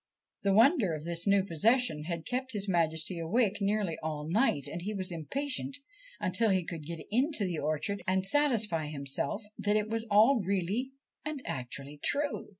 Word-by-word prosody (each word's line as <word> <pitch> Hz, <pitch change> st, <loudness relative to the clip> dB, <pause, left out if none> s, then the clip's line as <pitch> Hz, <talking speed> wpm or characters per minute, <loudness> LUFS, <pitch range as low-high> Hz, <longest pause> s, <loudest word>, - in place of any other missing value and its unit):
The 200 Hz, -, +2 dB
wonder 225 Hz, -, +5 dB
of 150 Hz, -, -7 dB
this 170 Hz, +2 st, 0 dB
new 200 Hz, -1 st, +4 dB
possession 200 Hz, -, +2 dB
had 170 Hz, -1 st, -4 dB
kept 260 Hz, +1 st, -2 dB
his 205 Hz, -1 st, -2 dB
Majesty 165 Hz, -1 st, +1 dB
awake 205 Hz, +4 st, +1 dB
nearly 200 Hz, -4 st, 0 dB
all 155 Hz, -1 st, -4 dB
night, 170 Hz, -, +2 dB
and 170 Hz, +4 st, -3 dB
he 210 Hz, +4 st, -3 dB
was 185 Hz, -2 st, -3 dB
impatient 270 Hz, -, -2 dB, 0.4 s
until 215 Hz, +5 st, +1 dB
he 190 Hz, -2 st, +2 dB
could 165 Hz, -3 st, -7 dB
get 165 Hz, -3 st, -6 dB
into 255 Hz, -1 st, +2 dB
the 175 Hz, -4 st, -2 dB
orchard 155 Hz, +7 st, -1 dB
and 190 Hz, 0 st, +1 dB
satisfy 215 Hz, -, +2 dB
himself 140 Hz, -, -2 dB, 0.2 s
that 205 Hz, 0 st, +1 dB
it 215 Hz, 0 st, -1 dB
was 225 Hz, 0 st, -2 dB
all 220 Hz, +5 st, +5 dB
really 200 Hz, +7 st, -1 dB, 0.3 s
and 300 Hz, -3 st, -5 dB
actually 140 Hz, 0 st, -5 dB
true. 290 Hz, 0 st, 0 dB
195 Hz, 170 wpm, -31 LUFS, 165-230 Hz, 0.4 s, wonder